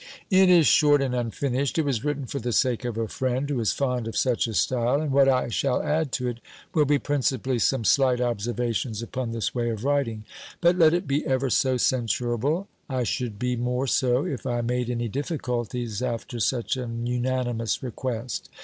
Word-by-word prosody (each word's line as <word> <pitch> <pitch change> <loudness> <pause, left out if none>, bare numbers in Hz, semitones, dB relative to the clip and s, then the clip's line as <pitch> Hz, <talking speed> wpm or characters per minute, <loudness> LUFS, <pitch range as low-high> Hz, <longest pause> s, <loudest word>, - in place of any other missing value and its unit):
"It 190 0 +6
is 175 -3 +6
short 145 -1 +5
and 135 -2 -1
unfinished. 125 +3 -1
It 160 - +2
was 135 -5 -1
written 145 -2 -2
for 140 - -4
the 120 0 -3
sake 125 0 +1
of 120 -2 -3
a 115 -1 -1
friend, 130 +4 -1
who 140 -3 -1
is 110 - +1
fond 125 -4 -1
of 115 - -4
such 125 -2 +1
a 110 - -5
style; 125 +4 +1
and 155 -2 -2
what 135 0 +5
I 130 -2 +2
shall 125 +3 0
add 155 -2 0
to 125 - -1
it, 120 -1 -4 0.3
will 155 -4 +3
be 145 +1 +3
principally 130 -3 -1
some 130 0 +1
slight 130 +1 +3
observations 120 -1 -2
upon 125 +1 -4
this 115 -1 -2
way 120 -1 -1
of 110 -1 -4
writing. 135 -6 0 0.4
But, 175 0 +4
let 165 -2 +5
it 175 +2 -1
be 140 +2 0
ever 130 -1 0
so 130 +1 +2
censurable, 125 - 0 0.2
I 130 -2 -1
should 120 -2 -2
be 125 +3 -1
more 125 +2 -1
so, 125 0 +2
if 135 -2 -4
I 120 -1 0
made 125 +1 -1
any 120 -1 -1
difficulties 125 - -3
after 120 -1 -3
such 120 +3 0
an 120 -2 -4
unanimous 125 -2 -1
request." 125 -1 -4
125 Hz, 195 wpm, -25 LUFS, 120-140 Hz, 0.4 s, It